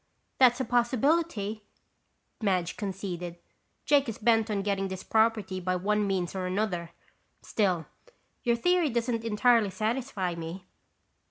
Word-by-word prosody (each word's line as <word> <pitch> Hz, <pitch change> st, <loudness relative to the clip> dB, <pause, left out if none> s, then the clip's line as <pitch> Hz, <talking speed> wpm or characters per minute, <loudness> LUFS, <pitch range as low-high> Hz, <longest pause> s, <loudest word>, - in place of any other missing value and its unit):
"That's 250 Hz, -1 st, +6 dB
a 260 Hz, -, 0 dB
possibility," 240 Hz, -2 st, +1 dB, 0.8 s
Madge 185 Hz, -5 st, 0 dB
conceded. 180 Hz, -4 st, -5 dB, 0.5 s
"Jake 285 Hz, -3 st, +3 dB
is 225 Hz, -, -5 dB
bent 225 Hz, 0 st, +3 dB
on 200 Hz, -2 st, -1 dB
getting 195 Hz, -1 st, 0 dB
this 190 Hz, -1 st, -6 dB
property 220 Hz, -4 st, +1 dB
by 185 Hz, 0 st, -1 dB
one 205 Hz, +3 st, +1 dB
means 185 Hz, -3 st, -1 dB
or 185 Hz, -1 st, -3 dB
another. 180 Hz, -3 st, -1 dB, 0.5 s
Still, 185 Hz, -7 st, 0 dB, 0.6 s
your 235 Hz, -1 st, +2 dB
theory 355 Hz, +5 st, +2 dB
doesn't 235 Hz, -1 st, -1 dB
entirely 230 Hz, 0 st, +3 dB
satisfy 215 Hz, -2 st, -2 dB
me." 170 Hz, +3 st, -7 dB
210 Hz, 125 wpm, -28 LUFS, 185-235 Hz, 0.8 s, That's